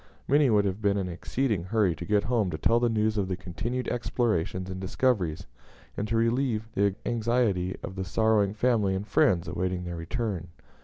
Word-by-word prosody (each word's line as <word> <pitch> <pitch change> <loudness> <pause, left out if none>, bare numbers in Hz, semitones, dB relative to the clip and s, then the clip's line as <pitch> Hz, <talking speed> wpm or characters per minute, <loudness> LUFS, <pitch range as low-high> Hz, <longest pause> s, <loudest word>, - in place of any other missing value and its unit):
Many 145 0 +4
would 105 -2 +3
have 100 +2 -2
been 100 -1 +2
in 95 -2 -1
exceeding 105 +3 -1
hurry 100 -2 +2
to 85 +2 -7
get 105 +2 +2
home 115 -5 +1
to 80 - -3
tell 115 +9 +3
the 120 0 +2
news 110 -1 +1
of 95 - 0
the 90 -1 -2
continued 115 +8 -4
explorations 105 -7 -1
and 95 0 -6
discoveries, 95 -5 0 0.5
and 105 - -2
to 115 +1 0
relieve 115 -1 +1
the 100 -2 +1
anxiety 115 -6 0
of 95 - -6
the 95 - -3
sorrowing 105 +1 +2
family 110 -5 +2
and 95 +2 -3
friends 90 -3 +3
awaiting 90 +1 -2
their 85 -1 -5
return. 90 +1 -3
100 Hz, 190 wpm, -27 LUFS, 90-115 Hz, 0.5 s, Many